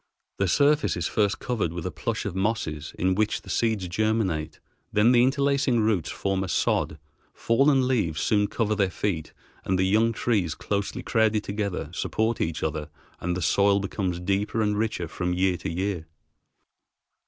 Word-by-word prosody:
The 100 - +2
surface 145 - +3
is 85 - -2
first 105 +1 +1
covered 115 -9 -2
with 85 -1 -6
a - - -2
plush - - -3
of - - -3
mosses 95 -7 -2
in 95 +1 +2
which 105 +2 0
the - - -7
seeds 110 -5 0
germinate; 95 -5 -1 0.3
then 105 +4 +4
the 120 -1 +5
interlacing 140 -1 +2
roots 105 -6 +1
form 95 -1 -1
a - - -4
sod, 75 -2 0 0.4
fallen 135 +2 +3
leaves 90 -12 0
soon 105 +2 +2
cover 110 -1 0
their 100 -3 +1
feet, 90 -4 -3 0.3
and 95 - 0
the 95 - +2
young 110 +4 +3
trees, 105 -8 0
closely 100 -1 -3
crowded 110 -2 +2
together, 100 -2 -3
support 110 +1 -1
each 80 -1 -2
other, 75 -1 -2 0.3
and 90 0 -2
the 90 - -3
soil 100 +5 +3
becomes 95 -3 -2
deeper 100 +4 0
and 105 0 +1
richer 110 -6 -1
from 90 +2 -2
year 95 0 +2
to - - -5
year. 90 -1 -2
100 Hz, 170 wpm, -26 LUFS, 90-110 Hz, 0.4 s, the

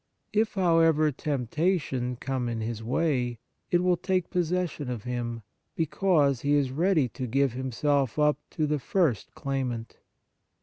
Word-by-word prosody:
If, 215 0 +1
however, 165 -4 +4
temptation 140 -1 -1
come 125 -1 -2
in 115 -1 -3
his 110 0 -4
way, 125 -1 0 0.3
it 175 0 +2
will 180 -1 +3
take 185 0 -1
possession 175 -5 -1
of 120 -4 -4
him, 120 -2 -4 0.3
because 155 -5 +2
he 145 +1 +2
is 140 -3 +1
ready 160 -1 +2
to 125 +2 -5
give 135 +1 +1
himself 130 +1 0
up 150 0 +3
to 155 - -1
the 150 0 0
first 145 - 0
claimant. 125 -4 -3
140 Hz, 140 wpm, -27 LUFS, 125-165 Hz, 0.3 s, however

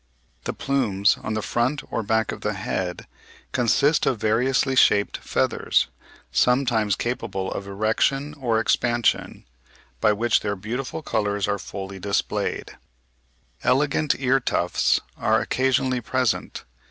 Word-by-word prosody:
The - - -2
plumes 105 -8 +1
on 110 - -3
the 110 - -2
front 130 +5 0
or - - -1
back 110 +1 0
of - - -7
the 105 - -1
head 95 -1 -3 0.5
consist 130 +5 +2
of 125 - +1
variously 125 +5 +1
shaped 105 -5 +4
feathers, - - 0 0.4
sometimes 120 -5 +2
capable 115 -6 -3
of 100 - -5
erection 110 +8 0
or 120 -6 0
expansion, 120 +1 0 0.5
by 110 -1 +4
which 115 +3 +2
their 100 -1 -2
beautiful 125 +10 -5
colours 105 -4 -1
are 100 -1 -1
fully 95 0 -7
displayed. 100 +1 -2 0.9
Elegant 140 +4 +2
ear 135 0 +2
tufts 90 -8 +1
(Fig. - - -1
39) - - -2
are - - +5
occasionally 130 -1 +1
present. 125 0 -1
115 Hz, 130 wpm, -24 LUFS, 105-130 Hz, 0.9 s, are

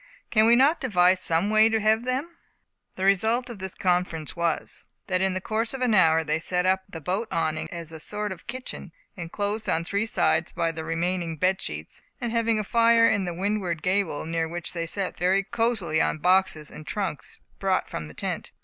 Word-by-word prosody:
Can 215 0 +5
we 235 - +7
not 280 +7 +4
devise 185 -7 +3
some 170 +5 +1
way 215 +1 +6
to 225 0 +1
have 220 +2 +2
them?" 275 +7 -2 0.6
The 190 - -2
result 220 +6 +2
of 220 - -9
this 190 0 -5
conference 175 -4 -1
was, 170 -2 -2 0.2
that 185 -1 0
in 190 -1 +1
the - - 0
course 225 +6 -2
of 265 - -6
an 245 -3 +2
hour 165 -4 +5
they 155 0 0
set 180 +2 0
up 190 0 +2
the 165 - -7
boat 190 +9 -2
awning 160 -1 -1
as 170 -2 -7
a 160 - -7
sort 210 +5 -3
of 180 -3 -9
kitchen, 250 -8 -7 0.2
enclosed 205 +5 -3
on 165 +1 +1
three 200 +4 -1
sides 160 -6 +1
by 165 - -1
the 160 0 -6
remaining 165 0 -2
bed 185 +4 +1
sheets, 75 +1 -6 0.2
and 240 -2 -3
having 230 -1 +1
a 215 - -1
fire 230 +2 +4
at 205 -3 +1
the 175 - -2
windward 185 -4 -2
gable, 185 -6 0
near 165 0 -1
which 170 +1 -5
they 170 -1 -3
sat 195 +2 -2
very 190 +2 +2
cosily 225 -8 0
on - - +1
boxes 180 -3 +2
and 155 - -11
trunks 195 -8 -4 0.2
brought 190 -1 +1
from 80 - -6
the 75 - -13
tent. - - -4
190 Hz, 205 wpm, -25 LUFS, 165-220 Hz, 0.6 s, we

